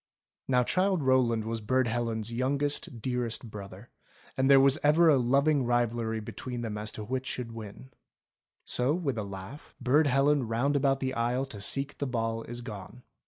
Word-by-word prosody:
Now 125 Hz, -1 st, +3 dB
Childe 185 Hz, +3 st, +1 dB
Rowland 125 Hz, -4 st, +2 dB
was 115 Hz, 0 st, -3 dB
Burd 130 Hz, +3 st, +1 dB
Helen's 115 Hz, -1 st, -2 dB
youngest, 135 Hz, -2 st, -2 dB
dear 125 Hz, -2 st, -1 dB
est 115 Hz, 0 st, -6 dB
brother, 100 Hz, +1 st, -10 dB, 0.4 s
and 135 Hz, +1 st, +2 dB
there 135 Hz, -1 st, +8 dB
was 135 Hz, +2 st, +5 dB
ever 160 Hz, +3 st, +5 dB
a 145 Hz, -, +5 dB
loving 140 Hz, +3 st, +2 dB
rivalry 120 Hz, -2 st, 0 dB
between 120 Hz, +3 st, -6 dB
them 110 Hz, -3 st, -4 dB
as 105 Hz, +1 st, -2 dB
to 110 Hz, -, -6 dB
which 130 Hz, +4 st, -3 dB
should 120 Hz, -2 st, -4 dB
win. 115 Hz, +3 st, -10 dB, 0.7 s
So 125 Hz, +5 st, +1 dB
with 140 Hz, -10 st, -2 dB
a -, -, -2 dB
laugh 100 Hz, +8 st, -9 dB
— -, -, -47 dB
Burd 145 Hz, +5 st, +3 dB
Helen 140 Hz, -1 st, +2 dB
round 125 Hz, +6 st, 0 dB
about 135 Hz, -1 st, +2 dB
the 130 Hz, -1 st, -1 dB
aisle 125 Hz, +2 st, 0 dB
To 110 Hz, -7 st, -10 dB
seek 135 Hz, +7 st, -1 dB
the 140 Hz, -, -1 dB
ball 115 Hz, -2 st, -2 dB
is 120 Hz, +1 st, -6 dB
gone. 115 Hz, +1 st, -9 dB
125 Hz, 185 wpm, -29 LUFS, 115-135 Hz, 0.7 s, there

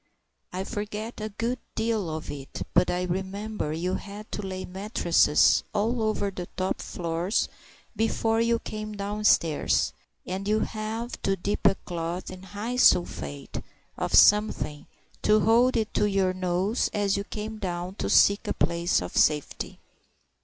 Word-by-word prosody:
I 185 Hz, +1 st, -3 dB
forget 210 Hz, +3 st, -5 dB
a 215 Hz, -, -3 dB
good 230 Hz, +4 st, -2 dB, 0.2 s
deal 220 Hz, -5 st, 0 dB
of 155 Hz, 0 st, -5 dB
it, 140 Hz, -2 st, -6 dB
but -, -, +4 dB
I 180 Hz, 0 st, 0 dB
remember 190 Hz, 0 st, -3 dB
you 175 Hz, +4 st, -2 dB
had 205 Hz, +2 st, -7 dB
to -, -, -3 dB
lay 185 Hz, -1 st, -5 dB
mattresses 185 Hz, -5 st, +3 dB
all 225 Hz, +3 st, +1 dB
over 215 Hz, -2 st, 0 dB
the 180 Hz, -2 st, -6 dB
top 185 Hz, 0 st, -1 dB
floors 170 Hz, +3 st, -1 dB, 0.5 s
before 225 Hz, +1 st, +1 dB
you 230 Hz, 0 st, +3 dB
came 215 Hz, -1 st, -6 dB
downstairs, 200 Hz, -6 st, +2 dB, 0.3 s
and 190 Hz, +2 st, -4 dB
you 215 Hz, +1 st, +2 dB
had 225 Hz, +2 st, -4 dB
to 195 Hz, -, +1 dB
dip 200 Hz, +3 st, 0 dB
a 195 Hz, -, +4 dB
cloth 175 Hz, +1 st, -5 dB
in 185 Hz, 0 st, -9 dB
hyposulphate 190 Hz, -, +1 dB, 0.3 s
of -, -, -1 dB
something, 210 Hz, -8 st, +4 dB, 0.4 s
and 215 Hz, 0 st, +4 dB
hold 235 Hz, +3 st, +4 dB
it 220 Hz, -1 st, -1 dB
to -, -, +2 dB
your 195 Hz, -2 st, +2 dB
nose 185 Hz, +4 st, 0 dB
as 205 Hz, -1 st, +1 dB
you 200 Hz, -, -1 dB
came 215 Hz, +1 st, -6 dB
down 180 Hz, -2 st, -3 dB
to -, -, -2 dB
seek 200 Hz, +1 st, +5 dB
a -, -, -1 dB
place 170 Hz, -, +1 dB
of 90 Hz, -, -7 dB
safety. 150 Hz, -2 st, +1 dB
200 Hz, 150 wpm, -27 LUFS, 180-215 Hz, 0.5 s, seek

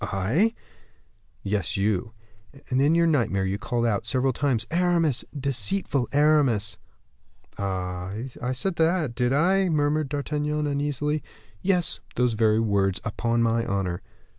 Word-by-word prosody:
"I?" 135 Hz, -, +1 dB, 0.9 s
"Yes, 100 Hz, -3 st, -1 dB
you; 105 Hz, +2 st, 0 dB, 0.6 s
and 130 Hz, +1 st, +2 dB
in 150 Hz, +4 st, +4 dB
your 170 Hz, 0 st, +4 dB
nightmare 115 Hz, -12 st, +1 dB
you 95 Hz, +1 st, -2 dB
called 120 Hz, +2 st, -1 dB
out, 105 Hz, -4 st, 0 dB
several 130 Hz, 0 st, +1 dB
times, 125 Hz, -4 st, 0 dB
'Aramis, 170 Hz, -5 st, +2 dB, 0.2 s
deceitful 140 Hz, -, -1 dB
Aramis!'" 140 Hz, -8 st, +3 dB, 0.8 s
"Ah! 90 Hz, -2 st, -3 dB, 0.3 s
I 125 Hz, +1 st, -1 dB
said 170 Hz, +8 st, -2 dB
that, 160 Hz, -5 st, +1 dB
did 125 Hz, +1 st, 0 dB
I?" 185 Hz, +6 st, +3 dB
murmured 150 Hz, -1 st, +1 dB
D'Artagnan, 150 Hz, +1 st, -2 dB
uneasily. 145 Hz, +1 st, -1 dB, 0.4 s
"Yes, 180 Hz, -3 st, +1 dB, 0.2 s
those 125 Hz, -2 st, +2 dB
very 110 Hz, 0 st, +3 dB
words, 100 Hz, -4 st, +1 dB
upon 115 Hz, +1 st, 0 dB
my 115 Hz, 0 st, +1 dB
honor." 95 Hz, -4 st, -2 dB
130 Hz, 130 wpm, -25 LUFS, 110-150 Hz, 0.9 s, in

